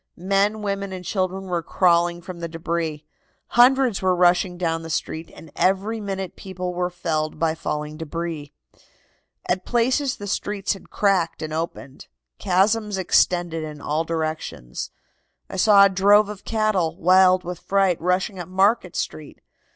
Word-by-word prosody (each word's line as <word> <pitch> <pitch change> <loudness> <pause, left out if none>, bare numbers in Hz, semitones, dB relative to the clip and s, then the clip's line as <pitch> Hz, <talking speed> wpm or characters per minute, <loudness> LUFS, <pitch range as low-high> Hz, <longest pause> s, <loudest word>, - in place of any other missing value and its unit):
Men, 200 +4 +1
women 200 -1 -3
and 185 -1 -7
children 190 0 -2
were 180 -3 -2
crawling 175 0 +2
from 180 -1 -8
the 170 - -4
debris. 165 -2 -3 0.4
Hundreds 250 -2 +4
were 185 -1 +2
rushing 180 0 +3
down 165 -2 -1
the 165 - -8
street, 160 +1 -3
and 160 - -14
every 195 +4 +1
minute 195 -2 -4
people 185 -1 -5
were 180 0 -1
felled 160 -4 -2
by 160 0 +1
falling 150 -1 -4
debris. 160 -2 -5 1.0
"At 185 +1 0
places 250 +3 +1
the 205 - -8
streets 205 0 -2
had 195 - -13
cracked 185 -6 +1
and 155 0 -5
opened. 155 -4 -5 0.3
Chasms 210 +2 +1
extended 175 -2 +1
in 150 -1 -7
all 150 +3 -1
directions. 155 - -4 0.6
I - - -5
saw 200 0 +7
a - - +4
drove 200 +2 +4
of 210 -2 -9
cattle, 210 -7 0
wild 185 +1 +5
with 175 0 -6
fright, 195 -3 +1
rushing 180 +3 0
up 175 - -6
Market 190 0 +2
Street. 150 -2 -5
180 Hz, 150 wpm, -23 LUFS, 165-195 Hz, 1.0 s, saw